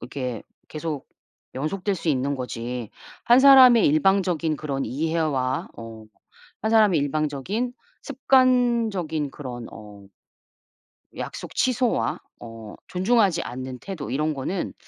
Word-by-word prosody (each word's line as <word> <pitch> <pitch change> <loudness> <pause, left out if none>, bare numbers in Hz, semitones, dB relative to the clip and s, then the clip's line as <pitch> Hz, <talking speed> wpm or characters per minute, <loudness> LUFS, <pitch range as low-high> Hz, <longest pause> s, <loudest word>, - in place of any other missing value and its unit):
이렇게 125 -2 -5 0.3
계속 155 -2 -5 0.5
연속될 180 +9 -2
수 170 - -5
있는 140 0 0
거지 120 -2 -5 0.3
1 240 +2 +6
사람의 260 -4 +8
일방적인 170 -1 +2
그런 135 -2 -3
이해와 145 -3 -1
어 115 -1 -10 0.6
1 220 - +1
사람의 210 -8 +4
일방적인 155 - -2 0.3
습관적인 235 - +1
그런 125 -4 -7
어 105 -2 -12 1.1
약속 - - -7
취소와 245 - 0 0.2
어 115 -2 -10
존중하지 190 -2 +2
않는 130 +1 -7
태도 180 -7 -7
이런 150 +4 -1
거는 150 +7 -4
155 Hz, 235 characters per minute, -24 LUFS, 130-200 Hz, 1.1 s, 사람의